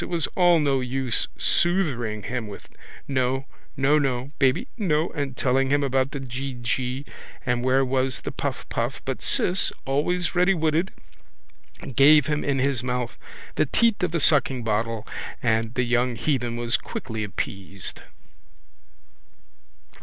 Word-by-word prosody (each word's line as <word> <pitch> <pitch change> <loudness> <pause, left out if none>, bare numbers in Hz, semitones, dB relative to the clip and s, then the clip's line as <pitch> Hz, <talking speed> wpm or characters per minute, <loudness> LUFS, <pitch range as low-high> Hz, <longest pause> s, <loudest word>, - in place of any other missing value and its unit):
It - - -6
was 170 -4 +1
all 175 -2 +5
no 140 -3 +2
use 130 -1 0
soothering 130 - +1
him 120 -1 -3
with 100 - -10 0.4
no, 130 0 0 0.3
nono, 135 -2 +2
baby, 135 - +2
no 165 -7 +1
and 140 -4 -4
telling 135 +1 +2
him 145 +1 +2
about 135 -1 +1
the 140 - -5
geegee 130 0 -3 0.4
and 125 -2 0
where 130 +1 +3
was 130 0 0
the - - -4
puffpuff - - -3
but - - -3
Ciss, 180 +1 +1
always 155 +5 0
readywitted, 175 -1 +2 1.1
gave 150 +1 +7
him 150 0 -1
in 140 -1 0
his 135 -2 +1
mouth 125 -1 -2 0.4
the - - +3
teat 230 - +2
of 180 - +1
the 170 - -1
suckingbottle 115 -7 +1 0.4
and 115 0 +1
the 125 - +2
young 120 0 +1
heathen 120 -4 -1
was 120 0 +1
quickly 110 -3 -5
appeased. 100 -1 -5
135 Hz, 130 wpm, -25 LUFS, 120-150 Hz, 1.1 s, gave